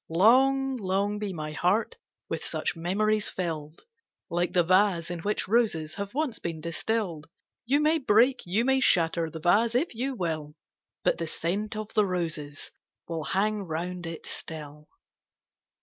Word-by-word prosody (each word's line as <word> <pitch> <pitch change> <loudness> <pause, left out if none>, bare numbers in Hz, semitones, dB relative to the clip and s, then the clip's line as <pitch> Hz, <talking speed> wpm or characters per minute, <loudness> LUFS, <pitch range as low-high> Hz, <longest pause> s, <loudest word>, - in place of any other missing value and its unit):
Long, 265 +9 +4
long 200 0 0
be 210 -2 -3
my 155 -3 -5
heart 185 +8 +1 0.3
with - - -3
such - - -2
memories 205 +5 +1
fill'd! 160 -3 -4 0.5
Like 175 +1 0
the 175 - +3
vase, 185 -1 +3
in 175 - -4
which 205 +4 -1
roses 195 -9 +1
have 200 +3 -6
once 290 -6 -1
been 165 -2 -4
distill'd 170 0 -2 0.2
— - - -64
You 280 +4 +3
may 310 +2 +3
break, 255 +1 +4
you 200 +7 0
may 265 0 +3
shatter 165 -8 +3
the 160 - -7
vase 215 +8 +3
if 285 +5 +1
you 260 +4 -2
will, 155 -6 -3 0.5
But - - +2
the 165 - -2
scent 200 +7 -2
of 215 0 -5
the 210 -2 +3
roses 160 -5 -4 0.4
will 165 -2 -4
hang 210 +3 +1
round 175 0 -4
it 165 -1 -7
still. 150 -1 -8
185 Hz, 160 wpm, -28 LUFS, 165-220 Hz, 0.5 s, Long